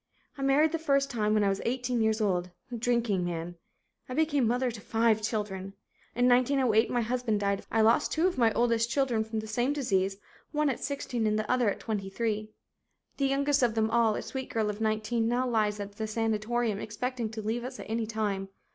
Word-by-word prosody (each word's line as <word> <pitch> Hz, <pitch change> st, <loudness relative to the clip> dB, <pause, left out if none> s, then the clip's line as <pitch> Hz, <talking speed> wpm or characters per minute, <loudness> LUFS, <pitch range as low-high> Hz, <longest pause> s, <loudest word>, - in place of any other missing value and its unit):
I 275 Hz, -, -8 dB
married 280 Hz, +3 st, +4 dB
the 330 Hz, -, -1 dB
first 275 Hz, -3 st, +1 dB
time 215 Hz, -3 st, +1 dB
when 210 Hz, -, +3 dB
I 200 Hz, -, +3 dB
was 195 Hz, 0 st, -1 dB
eighteen 245 Hz, -1 st, -1 dB
years 220 Hz, 0 st, +1 dB
old, 180 Hz, -3 st, 0 dB, 0.2 s
a -, -, -3 dB
drinking 235 Hz, -5 st, +1 dB
man. 175 Hz, 0 st, -4 dB, 0.5 s
I 255 Hz, -, -4 dB
became 290 Hz, -6 st, +2 dB
mother 245 Hz, +2 st, +1 dB
to 220 Hz, -2 st, -9 dB
five 225 Hz, 0 st, +2 dB
children. 205 Hz, -3 st, -3 dB, 0.4 s
In 245 Hz, +1 st, +3 dB
1908 250 Hz, -2 st, +3 dB
my 245 Hz, -, +1 dB
husband 235 Hz, -2 st, 0 dB
died 200 Hz, -1 st, 0 dB
of -, -, -13 dB
consumption. 220 Hz, -1 st, +3 dB
I -, -, +6 dB
lost -, -, 0 dB
two 320 Hz, +2 st, +1 dB
of 370 Hz, -, +1 dB
my 230 Hz, -3 st, +3 dB
oldest 230 Hz, 0 st, +2 dB
children 240 Hz, -4 st, +1 dB
from 220 Hz, 0 st, -3 dB
the -, -, -8 dB
same 240 Hz, +6 st, 0 dB
disease, 195 Hz, -9 st, 0 dB, 0.3 s
one 300 Hz, -2 st, +1 dB
at 250 Hz, -, -5 dB
16 250 Hz, -5 st, -2 dB
and 215 Hz, 0 st, +1 dB
the 215 Hz, 0 st, -2 dB
other 250 Hz, -4 st, +3 dB
at -, -, -3 dB
23. 215 Hz, +1 st, -2 dB, 0.7 s
The 275 Hz, -, +2 dB
youngest 280 Hz, +1 st, +2 dB
of 235 Hz, -3 st, +2 dB
them 220 Hz, 0 st, +1 dB
all, 230 Hz, -2 st, +3 dB
a -, -, -4 dB
sweet 265 Hz, -1 st, -5 dB
girl 215 Hz, -2 st, 0 dB
of 210 Hz, +1 st, -9 dB
nineteen, 220 Hz, +1 st, 0 dB
now 245 Hz, +2 st, +1 dB
lies 215 Hz, -3 st, +1 dB
at 200 Hz, 0 st, -6 dB
sanatorium 225 Hz, 0 st, 0 dB
expecting 235 Hz, +2 st, -3 dB
to 220 Hz, 0 st, -6 dB
leave 225 Hz, +3 st, -2 dB
us 255 Hz, +1 st, -7 dB
at -, -, -8 dB
any 225 Hz, 0 st, -2 dB
time. 205 Hz, -3 st, -2 dB
225 Hz, 215 wpm, -29 LUFS, 215-250 Hz, 0.7 s, I